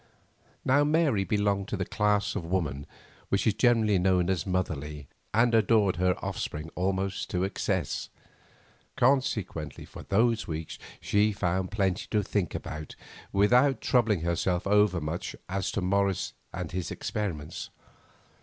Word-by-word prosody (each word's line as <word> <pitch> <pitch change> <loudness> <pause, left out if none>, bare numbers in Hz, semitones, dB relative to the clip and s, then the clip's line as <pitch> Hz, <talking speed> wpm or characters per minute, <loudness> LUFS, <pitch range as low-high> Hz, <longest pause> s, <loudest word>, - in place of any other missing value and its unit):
Now 140 +3 +4
Mary 150 -9 +2
belonged 100 -1 0
to 105 - -3
the 95 - -2
class 105 -1 +1
of - - -2
woman 80 -5 -2 0.4
which 100 - +1
is 110 - +4
generally 110 -4 +3
known 90 0 +2
as 95 +1 -2
"motherly," 75 -6 -3 0.2
and 115 +2 +3
adored 105 -4 +3
her 90 0 +2
offspring 75 +2 -4
almost 95 +1 -1
to 90 0 0
excess. 95 - -2 0.9
Consequently 110 - 0
for - - -10
those 115 +3 +1
weeks 80 -1 -5 0.2
she 105 +1 +2
found 95 -1 -1
plenty 95 -3 -1
to 105 -2 +1
think 95 -3 -1
about 75 0 -6 0.4
without 125 +7 +4
troubling 110 -8 +2
herself 85 +1 0
over 105 -2 +3
much 80 +3 -4
as 95 0 -2
to 100 - -1
Morris 100 +1 0 0.2
and - - -5
his 90 -1 -3
experiments. 85 -8 -4
95 Hz, 135 wpm, -28 LUFS, 90-105 Hz, 0.9 s, Now